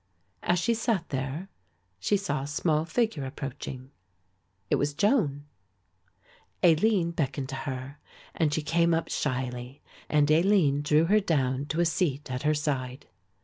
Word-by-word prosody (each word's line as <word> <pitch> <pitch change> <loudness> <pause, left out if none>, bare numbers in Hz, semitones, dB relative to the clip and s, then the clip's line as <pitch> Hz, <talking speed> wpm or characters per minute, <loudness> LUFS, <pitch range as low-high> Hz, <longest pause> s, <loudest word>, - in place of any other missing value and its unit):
As 175 - +2
she 230 +7 +1
sat 225 -6 -1
there 135 +7 -3 0.5
she 205 - +2
saw 150 -9 -2
a 140 - -5
small 155 +1 0
figure 220 - 0
approaching; 135 -1 -6 0.8
it - - +2
was 145 0 -1
Joan. 155 - +1 1.2
Aline 175 +1 +4
beckoned 140 -4 -2
to 135 - -4
her 130 +2 -6 0.3
and 160 -3 +1
she 155 +1 -1
came 170 +2 +2
up 165 - -2
shyly 125 -1 -3 0.3
and 150 0 +3
Aline 165 -4 +4
drew 150 +2 +3
her 210 +5 +4
down 140 -7 0
to 160 +3 0
a - - +3
seat 150 -5 -1
at 125 0 -3
her 155 0 +2
side. 135 -4 -3
150 Hz, 145 wpm, -28 LUFS, 135-170 Hz, 1.2 s, Aline